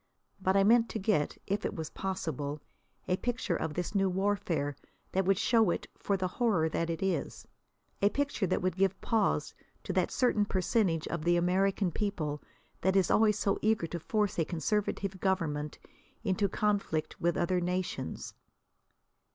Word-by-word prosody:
But 190 +1 +3
I 195 - +5
meant 230 +2 +5
to - - -3
get, 190 -7 +1
if 200 +2 -1
it - - -2
was 160 -2 -5
possible, 155 -6 -3 0.5
a 180 - +1
picture 235 -6 -1
of 160 -2 -3
this 180 +3 -2
new 195 -2 +2
warfare 185 -7 0 0.4
that 190 0 +1
would 195 0 +3
show 225 -1 +3
it - - -1
for 200 - -1
the 185 -1 0
horror 190 -5 +1
that 165 +1 -1
it 165 +2 -2
is; 180 -7 -2 0.5
a 200 - +5
picture 280 -6 -1
that - - 0
would 185 -2 0
give 195 0 +2
pause 225 -2 +1 0.3
to - - -3
that - - +2
certain 240 -5 +2
percentage 185 -4 +1
of 170 -2 -3
the 175 +1 +3
American 190 +2 +2
people 155 -8 -2 0.4
that 190 +1 +2
is 190 -3 +3
always 215 -1 +4
so 200 -1 0
eager 215 -5 +2
to 170 +1 -5
force 210 +1 0
a - - +4
conservative 195 +2 -1
government 160 -6 -1 0.5
into 200 -1 +1
conflict 200 -6 -1
with 170 0 +1
other 180 +1 +1
nations. 180 +1 -3
190 Hz, 165 wpm, -31 LUFS, 170-205 Hz, 0.5 s, I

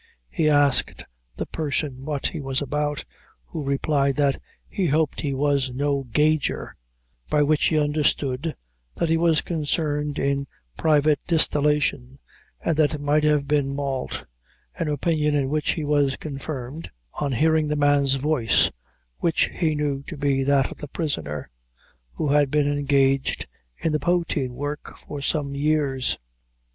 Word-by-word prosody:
He 155 -1 +2
asked 145 -2 +3 0.3
the - - -3
person 145 -4 -3
what 145 -2 -3
he 160 - -6
was 135 -1 -1
about, 150 +1 -2 0.4
who 160 - -6
replied 140 0 +1
that, 140 -2 +1 0.3
"he 190 -4 -1
hoped 155 0 +1
he 145 - -1
was 140 -2 +1
no 140 0 0
gauger;" 150 +5 +1 0.6
by 150 - +3
which 150 +1 +2
he 155 - +2
understood 145 -1 0 0.4
that 170 - 0
he 165 - +3
was 165 -2 +3
concerned 150 -2 -1
in 140 0 0 0.3
private 150 - +3
distillation, 150 -5 +2 0.4
and 165 - 0
that 155 -1 +3
it - - -6
might 150 +1 +2
have 150 -2 +2
been 145 -2 +1
malt; 135 -2 -3 0.5
an - - -3
opinion 150 0 +1
in 135 -2 +1
which 150 +1 +1
he 160 - -4
was 145 -2 +2
confirmed, 140 0 -6 0.2
on 140 -2 -2
hearing 155 +4 +3
the 150 - 0
man's 145 -2 +3
voice, 135 -5 +2 0.5
which 165 -2 +1
he 160 -3 0
knew 145 -2 -1
to 165 - -6
be 140 -1 +1
that 140 -1 +2
of - - -10
the 150 - -6
prisoner, 135 - -4 0.6
who 150 - -2
had 145 -1 +4
been 150 +1 +2
engaged 140 -2 +1 0.3
in 165 - -1
the 150 - +1
poteen 160 -6 0
work 145 +3 -5
for 145 -1 -8
some 140 0 -1
years. 140 -2 0
145 Hz, 150 wpm, -24 LUFS, 140-155 Hz, 0.6 s, had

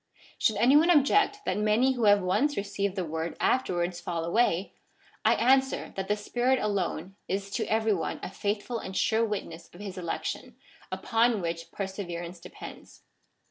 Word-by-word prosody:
Should 220 - +3
any 240 +7 +5
one 320 +4 +6
object 390 +7 +4
that - - 0
many 215 +5 +3
who 245 -4 0
have 205 -1 +5
once 215 +11 +1
received 200 -1 -2
the 185 -3 -2
word 160 +1 -4
afterwards 175 -8 0
fall 170 -1 -3
away, 190 -1 +1 0.5
I - - +5
answer 265 +3 +2
that 190 0 -3
the 210 - +1
Spirit 245 +5 +1
alone 195 -4 -2
is 195 +1 -3
to - - -2
every 220 0 +3
one 170 - -3
a - - -5
faithful 205 +4 -2
and 190 -2 -6
sure 225 +1 +2
witness 180 -6 -4
of 175 - -14
his 195 -3 -6
election, 170 -2 -4 0.4
upon 230 -1 +2
which 165 -1 -4
perseverance 180 -3 -5
depends. 175 - -11
200 Hz, 165 wpm, -28 LUFS, 180-235 Hz, 0.5 s, one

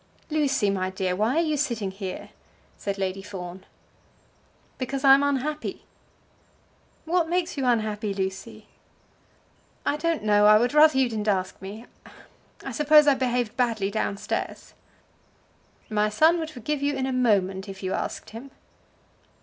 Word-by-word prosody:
"Lucy, 275 -9 +1
my 185 -1 -1
dear, 185 -1 -2
why 220 +7 +1
are 335 - +3
you 310 -2 0
sitting 235 -9 -2
here?" 190 -1 -7 0.5
said 200 -1 -4
Lady 190 0 -2
Fawn. 185 -2 -8 1.2
"Because 265 +1 -3
I 270 -1 +8
am 275 - +5
unhappy." 285 +2 -2 1.2
"What 335 0 +1
makes 355 0 -1
you 270 -3 -1
unhappy, 215 -3 0
Lucy?" 190 -1 -5 1.2
"I 290 - +1
don't 330 -4 -1
know. 210 -1 +4
I 215 0 +8
would 245 +4 +1
rather 300 -2 +6
you 265 -1 +4
didn't 215 -2 -4
ask 190 -3 -1
me. 205 +5 -8 0.8
I - - -4
suppose 300 0 +5
I 290 - +5
behaved 245 -3 -1
badly 225 -6 0
down 205 -1 -2
stairs." 205 - -5 1.1
"My 210 -1 +1
son 315 +11 +4
would 320 -1 -4
forgive 285 +1 -4
you 285 0 0
in 260 - -1
a 265 - -2
moment 195 -6 +1
if 195 0 -9
you 185 - -2
asked - - -4
him." 230 +5 -9
230 Hz, 150 wpm, -25 LUFS, 200-285 Hz, 1.2 s, I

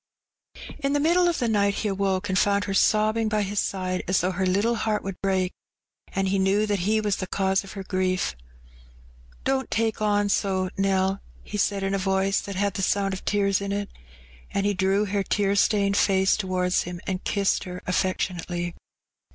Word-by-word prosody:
Tempted. - - -11
95 300 - -8
In 275 - +1
the 290 - +2
middle 345 +4 +3
of 345 - +1
the 240 - 0
night 200 -2 +2
he 215 - -2
awoke 195 0 0
and 185 -1 +1
found 200 0 +2
her 195 - -3
sob 215 +2 +3
bing 225 -1 0
by 210 -1 +1
his 200 +1 -2
side 185 -1 -2
as 185 0 +2
though 180 +2 0
her 190 +1 -1
httle 205 +6 +1
heart 215 -1 -1
wonld 195 -1 -6
break, 190 -2 0 0.6
and 195 0 +1
he 195 0 +1
knew 195 +3 +2
that 205 -2 0
he 210 +5 +1
was 210 -2 0
the 185 - -4
cause 190 0 +1
of 195 - -10
her 195 - -6
grief. 185 - -1 0.6
" - - -26
Don't 265 0 0
take 225 0 0
on 205 -1 +2
so, 190 -2 0
Nell," 195 0 +1 0.2
he 210 - -5
said, 200 0 +1
in 195 0 -1
a 195 - 0
voice 195 +1 +1
that 200 - -7
had 200 +1 0
the 195 - -3
BOiud 195 0 +1
of 190 - -6
tears 200 -1 +1
in 200 0 -3
it. 200 0 -3 0.6
And 200 - -1
he 205 - +2
drew 195 +2 +1
her 200 0 -1
tear 200 0 +1
stained 200 -1 +2
face 190 -1 +3
towards 185 -3 0
him 175 0 -6
and 185 -1 -3
kissed 200 -1 0
her 180 0 -7
affectionately. 175 -1 -1
195 Hz, 210 wpm, -25 LUFS, 185-205 Hz, 0.6 s, middle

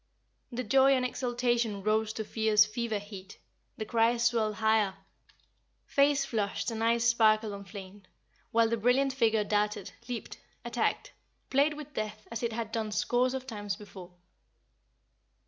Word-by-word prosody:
The 250 +1 -3
joy 270 +4 +5
and 255 -1 0
exultation 240 -4 -1
rose 215 +1 +1
to 220 - -4
fierce 215 0 +3
fever 220 0 -2
heat, 200 -1 -10 0.4
the 215 - -4
cries 230 +1 +2
swelled 225 -2 +1
higher, 220 -3 +2 0.9
faces 280 0 +3
flushed 215 0 -2
and 225 0 -3
eyes 230 0 +2
sparkled 220 -2 +3
and 200 -2 -9
flamed, 195 -1 -10 0.4
while 230 0 +3
the 230 +1 0
brilliant 255 +4 +2
figure 225 -4 +2
darted, 210 -1 -1 0.2
leaped, 240 -2 -6 0.3
attacked, - - -1 0.4
played 285 +3 +3
with 295 -1 -9
death 215 -1 -5
as 230 - -4
it 235 -1 -1
had 225 -1 -4
done 220 -1 -2
scores 245 +5 +1
of 260 -1 -5
times 205 -5 -4
before. 195 -3 -12
225 Hz, 145 wpm, -30 LUFS, 210-240 Hz, 0.9 s, joy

